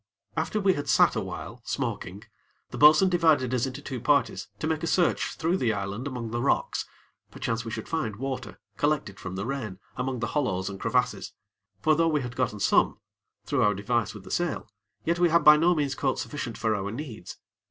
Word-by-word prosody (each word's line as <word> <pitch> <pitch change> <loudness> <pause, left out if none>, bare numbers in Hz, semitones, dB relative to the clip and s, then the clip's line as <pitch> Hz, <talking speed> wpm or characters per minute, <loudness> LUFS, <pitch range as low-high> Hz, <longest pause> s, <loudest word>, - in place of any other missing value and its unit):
After 215 - -1
we 195 -2 +3
had 145 -2 -4
sat - - +5
awhile, 115 +4 -5
smoking, 105 -8 -4 0.5
the - - -6
bo'sun 155 +6 +7
divided 160 -8 +3
us 125 +1 +1
into 135 +2 -7
two 130 -4 -5
parties 145 +3 +1
to - - -4
make 155 -1 0
a 165 - -2
search 175 +1 +1
through 170 +3 0
the 120 -10 +1
island 100 +5 -4
among 120 -4 -5
the 120 +1 -1
rocks, 140 - 0 0.4
perchance 115 0 -3
we 115 - -6
should 110 0 -5
find 125 -11 -2
water, 130 -1 -5 0.2
collected 145 -10 0
from 95 0 -6
the 100 +2 -3
rain, 120 -8 -4 0.2
among 125 +1 -2
the 120 - -2
hollows 100 -10 0
and 95 - -8
crevasses; 125 +2 0 0.5
for 155 - +4
though 165 +1 +3
we 150 -3 +1
had 120 -1 -6
gotten 115 -5 -1
some, - - +3 0.5
through - - 0
our 105 -1 +3
device 110 +1 -1
with 105 - -10
the - - -11
sail, 175 -3 -1 0.4
yet 170 +1 +1
we 175 -1 +4
had 165 -1 +4
by 150 0 +9
no 170 +3 +3
means 145 -3 0
caught 130 0 -1
sufficient 135 -6 -5
for 110 -1 +1
our 100 -1 -2
needs. 115 - -7
130 Hz, 205 wpm, -27 LUFS, 110-150 Hz, 0.5 s, by